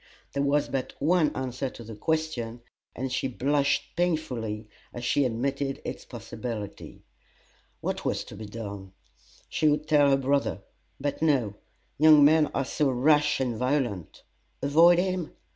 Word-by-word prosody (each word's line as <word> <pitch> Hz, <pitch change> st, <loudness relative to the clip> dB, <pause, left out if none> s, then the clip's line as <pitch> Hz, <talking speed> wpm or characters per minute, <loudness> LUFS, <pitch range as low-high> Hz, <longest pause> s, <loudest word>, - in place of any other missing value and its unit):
There 140 Hz, -, 0 dB
was 140 Hz, +1 st, +2 dB
but 130 Hz, -1 st, -3 dB
one 160 Hz, +1 st, +3 dB
answer 130 Hz, 0 st, -3 dB
to 120 Hz, -, -11 dB
the 110 Hz, 0 st, -9 dB
question, 125 Hz, -4 st, -2 dB, 0.3 s
and 130 Hz, +2 st, -3 dB
she 130 Hz, -, 0 dB
blushed 140 Hz, +2 st, 0 dB
painfully 125 Hz, -11 st, -2 dB, 0.2 s
as 120 Hz, 0 st, -6 dB
she 140 Hz, +3 st, +2 dB
admitted 135 Hz, +3 st, -2 dB
its -, -, -6 dB
possibility. 110 Hz, -5 st, -7 dB, 0.8 s
What -, -, -3 dB
was -, -, -1 dB
to -, -, -11 dB
be 110 Hz, +1 st, -8 dB
done? 100 Hz, -3 st, -7 dB, 0.5 s
She 155 Hz, -, +2 dB
would 150 Hz, +1 st, 0 dB
tell 145 Hz, -3 st, +5 dB
her 135 Hz, -, +4 dB
brother; 140 Hz, +1 st, 0 dB, 0.4 s
but 145 Hz, +2 st, -3 dB
no 135 Hz, -10 st, +2 dB, 0.5 s
young 155 Hz, -1 st, +8 dB
men 155 Hz, 0 st, +5 dB
are 135 Hz, -, 0 dB
so 145 Hz, +2 st, 0 dB
rash 150 Hz, +3 st, +3 dB
and 125 Hz, -3 st, -1 dB
violent. 125 Hz, -, -2 dB, 0.4 s
Avoid 165 Hz, +5 st, +6 dB
him? 185 Hz, -2 st, -1 dB
140 Hz, 145 wpm, -27 LUFS, 120-150 Hz, 0.8 s, young